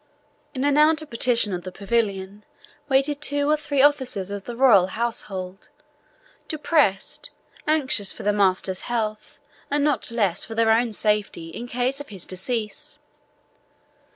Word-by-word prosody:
In 260 - -2
an 290 +1 +3
outer 310 +1 +4
partition 235 -5 0
of 180 - -3
the 185 - -8
pavilion 200 -1 -2 0.5
waited 280 +2 +2
two 285 -1 0
or - - +5
three 290 -2 0
officers 260 -10 +1
of 200 -1 -6
the 240 - -6
royal 230 -8 +5
household, 195 -3 -3 0.8
depressed, 295 - 0 0.4
anxious 265 -10 +1
for - - -9
their 210 - +2
master's 190 -2 +1
health, 215 -3 -3 0.3
and 290 0 +1
not 290 -6 +1
less 205 -7 0
so - - -3
for 225 - -7
their 225 0 +3
own 230 +1 +2
safety, 210 -6 0
in 235 +9 -7
case 250 +3 -1
of 285 - -11
his 195 -4 -6
decease. 210 +4 -4
230 Hz, 150 wpm, -23 LUFS, 200-275 Hz, 0.8 s, or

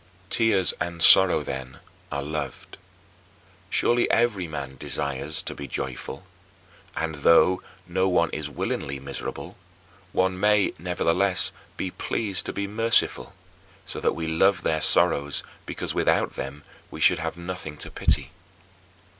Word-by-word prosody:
3. 115 - +3
Tears 95 -4 +3
and 85 -1 -3
sorrow, 90 -2 +7
then, 65 -2 -6 0.3
are 70 - -2
loved. 75 +2 -6 0.9
Surely 120 0 +2
every 105 -7 +2
man 70 -4 -6
desires 70 +4 -2
to - - -4
be 70 - -7
joyful. 65 -1 -5 0.7
And, 80 0 -1
though 85 +5 +5 0.2
no 95 +1 +1
one 85 -3 +2
is 75 -1 -4
willingly 70 -1 -3
miserable, 70 0 -7 0.5
one 95 0 +1
may, 105 0 +3
nevertheless, 90 +2 +1 0.3
be 95 - -3
pleased 100 -1 -2
to - - -2
be 100 - -3
merciful 110 - +1 0.5
so - - -5
that - - +1
we 80 +1 -3
love 90 +5 +2
their 80 -1 0
sorrows 70 -1 +2 0.2
because - - -3
without - - +1
them 70 +2 -6 0.3
we - - -9
should - - +4
have - - -4
nothing 85 -3 -6
to - - -6
pity. - - 0
85 Hz, 140 wpm, -25 LUFS, 70-95 Hz, 0.9 s, sorrow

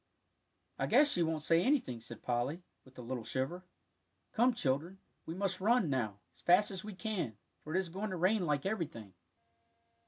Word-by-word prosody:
"I - - 0
guess 295 0 +6
she 175 - +3
won't 160 -2 0
say 165 +1 +4
anything," 240 - +1
said 115 0 -9
Polly, 125 +8 -1 0.2
with 130 0 -19
a 125 - -7
little 120 0 -4
shiver. 135 +10 -3 0.7
"Come, 245 +2 +3
children, 155 - -1 0.3
we 165 - -4
must 190 -1 -2
run, 215 - +3
now, 110 -7 -1 0.2
as - - -21
fast 195 +4 +5
as 190 0 -5
we 210 -2 -7
can, 185 - -3 0.2
for 155 +3 -6
it - - +4
is 190 -3 -3
going 195 +5 -4
to 185 - -3
rain 185 +1 +2
like 145 -2 0
everything." 150 - -3
170 Hz, 185 wpm, -34 LUFS, 130-195 Hz, 0.7 s, guess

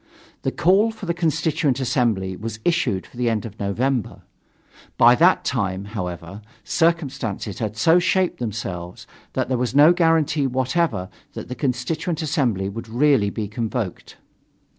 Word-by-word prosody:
The - - -1
call 195 +6 +3
for 220 -3 -8
the 170 - 0
Constituent 155 -5 0
Assembly 120 -8 0
was 110 +2 -6
issued 170 - +1
for - - -17
the 120 -1 +1
end 110 0 -1
of 110 -1 -9
November. 120 +4 -1 0.7
By 120 +1 +7
that 170 +8 +4
time, 100 -6 -1
however, 90 -2 -6 0.2
circumstances 135 - -1
had 110 -1 -3
so 165 +8 +5
shaped 185 0 +1
themselves 95 -6 -5 0.3
that - - -1
there 130 -1 -1
was 125 +1 -2
no 150 +4 +7
guarantee 160 -4 +2
whatever 130 - 0 0.3
that - - -8
the - - -3
Constituent 155 +6 -2
Assembly 125 - 0
would 110 +3 -7
really 125 -3 +3
be 105 0 -4
convoked. 110 -2 -4
125 Hz, 145 wpm, -22 LUFS, 105-160 Hz, 0.7 s, By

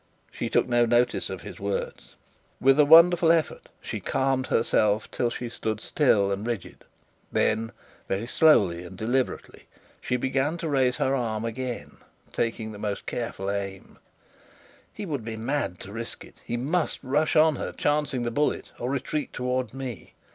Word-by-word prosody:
She - - -4
took - - +2
no 120 -1 +3
notice 120 +1 +2
of - - -6
his - - -9
words. 100 0 -4 0.4
With 135 +2 +4
a 150 - +7
wonderful 165 +2 +7
effort, 165 -2 0
she - - -5
calmed 130 -1 0
herself 110 -2 +1
till 120 - 0
she 120 +1 -5
stood 110 -2 -3
still 105 -8 +2
and 100 +3 -3
rigid. 115 -6 -5 0.5
Then 110 +1 +1 0.4
very 95 +4 -1
slowly 105 - +4
and 90 +1 -10
deliberately 125 +5 -2 0.3
she 125 - -1
began 135 +5 0
to 165 - -4
raise 130 -4 +2
her 135 - +1
arm 115 -4 -1
again, 125 +1 -5 0.4
taking 115 -1 -2
most 105 -2 -3
careful 100 -5 -3
aim. 100 -1 -5 0.9
He 210 - -7
would 145 - -3
be 110 0 -5
mad 115 -5 -2
to 100 - -9
risk 115 +1 -6
it. - - -19
He 120 - -3
must 155 +7 0
rush 145 +4 +1
on 155 -2 +5
her, - - -4
chancing 145 -4 0
the 120 - -1
bullet, 150 +5 -1
or 120 - -2
retreat 140 +1 -2
towards 125 -1 -2
me. 130 -4 -7
125 Hz, 160 wpm, -26 LUFS, 110-140 Hz, 0.9 s, a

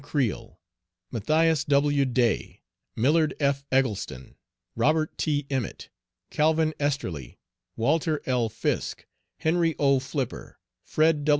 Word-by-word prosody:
Creel, 140 -7 -2 0.5
Matthias 155 +6 +2
W. 145 0 +3
Day, 120 -3 0 0.3
Millard 150 +5 +2
F. 140 -1 +1
Eggleston, 105 - -1 0.4
Robert 155 +1 +1
T. 145 -2 0
Emmet, 130 -5 -4 0.4
Calvin 155 +1 +2
Esterly, 95 - -3 0.4
Walter 155 +6 +1
L. 125 -3 +1
Fisk, - - -2 0.3
Henry 165 0 +1
O. 140 -2 +3
Flipper, 135 -1 -5 0.3
Fred. 155 -1 +2
145 Hz, 100 wpm, -26 LUFS, 130-155 Hz, 0.5 s, W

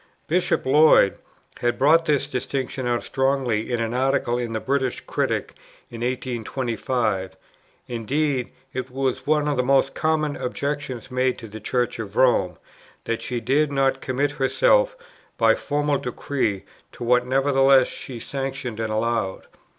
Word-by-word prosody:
Bishop 175 +3 +1
Lloyd 145 -7 +5 0.4
had 120 0 0
brought 160 +5 +4
this 145 -2 +2
distinction 130 -1 -3
out 120 -1 0
strongly 130 -5 0
in 120 - 0
an 115 0 -2
Article 125 -1 +1
in 120 -2 -3
the 110 - -1
British 130 0 -1
Critic - - -2 0.4
in 115 -1 -8
1825; 120 -4 -2 0.5
indeed, 130 +3 -1 0.2
it 130 -1 -4
was 130 0 -2
one 150 -1 +2
of 145 -2 0
the - - +3
most 135 +1 +3
common 155 -2 0
objections 135 -1 -4
made 130 0 +1
to 115 - -9
the 110 +1 -9
Church 120 +2 -1
of 105 -2 -6
Rome, 115 -9 +3 0.5
that 115 -1 -2
she 125 -1 -3
dared 140 +5 +1
not 135 -1 +1
commit 135 +3 0
herself - - +2 0.4
by - - +5
formal 145 -1 0
decree, 125 -5 -2 0.3
to - - -8
what 125 +1 +3
nevertheless 135 0 +4
she 125 -3 -8
sanctioned 135 -3 -4
and 110 -1 -2
allowed. 110 -3 -1
130 Hz, 145 wpm, -23 LUFS, 120-140 Hz, 0.5 s, Lloyd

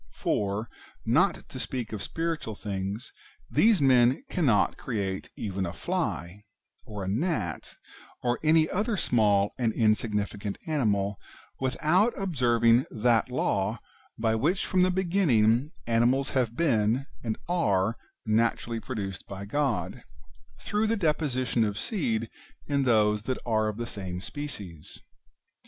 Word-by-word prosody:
For, 105 +2 -1 0.4
not - - +2
to - - -7
speak 120 -4 -4
of 105 - -4
spiritual 165 -8 -3
things, 100 +3 -4 0.4
these 215 -8 +4
men 125 - +4
cannot 125 - +2
create 100 -6 -3
even 95 -2 -3
a 85 -1 -3
fly, 85 +3 -3 0.4
or 105 -2 -6
a - - -4
gnat, 105 - -2 0.5
or 120 0 +1
any 155 0 +4
other 210 +4 -1
small 105 - +3
and 115 -3 +2
insignificant 105 -2 0
animal, 105 - 0 0.4
without 170 - +2
observing 120 -9 +3
that 115 0 +2
law 105 -4 0 0.4
by 110 -1 +1
which 155 - +1
from 185 - +2
the 185 - +4
beginning 155 - +2
animals 120 +4 +2
have 120 -3 0
been 120 -4 +2 0.2
and 110 -2 -2
are 110 - +1 0.3
naturally 115 +1 +1
produced 100 -7 -5
by 100 0 -7
God 135 +2 -1 0.3
— 70 0 -29
through 210 +1 +1
the 225 +1 +1
deposition 145 - +1
of 105 -2 -1
seed 115 - -1 0.4
in 140 -2 0
those 105 -3 +3
that 130 - 0
are 110 -2 +1
of 105 -1 -3
the 120 - -3
same 95 -6 -5
species. 100 - -7
115 Hz, 130 wpm, -28 LUFS, 105-145 Hz, 0.5 s, these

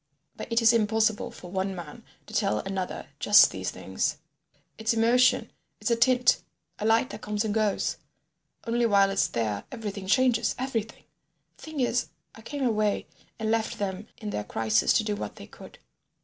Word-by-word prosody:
"But - - -8
it 230 0 +2
is 225 +1 +7
impossible 220 -1 +1
for 180 - -11
one 190 0 -2
man 170 -4 -9 0.2
to - - -13
tell 105 - +1
another 190 -1 -4
just - - +7
these - - -3
things. - - -2 0.6
It's 220 +1 +1
emotion, 240 +3 +3 0.3
it's - - -1
a - - +5
tint, 245 +1 +4 0.4
a 215 - -1
light 225 +3 +3
that 210 - -8
comes 210 +1 -2
and 210 - -1
goes. 215 -2 0 0.7
Only 235 0 +1
while 200 -2 +4
it's 195 - +2
there, 105 -3 -2
everything 205 -5 -6
changes, 240 0 +2
everything. 235 -4 -4 0.5
The - - -20
thing 315 -2 -6
is 245 0 +1 0.3
I 225 - -13
came 280 +5 -5
away 215 -4 +1 0.3
and 220 0 -1
left 225 -1 0
them 195 +1 -4
in 215 -2 -5
their 105 - -3
Crisis 110 0 +1
to 220 - +3
do 210 -1 -1
what - - -6
they - - -10
could." - - -14
220 Hz, 175 wpm, -27 LUFS, 200-235 Hz, 0.7 s, is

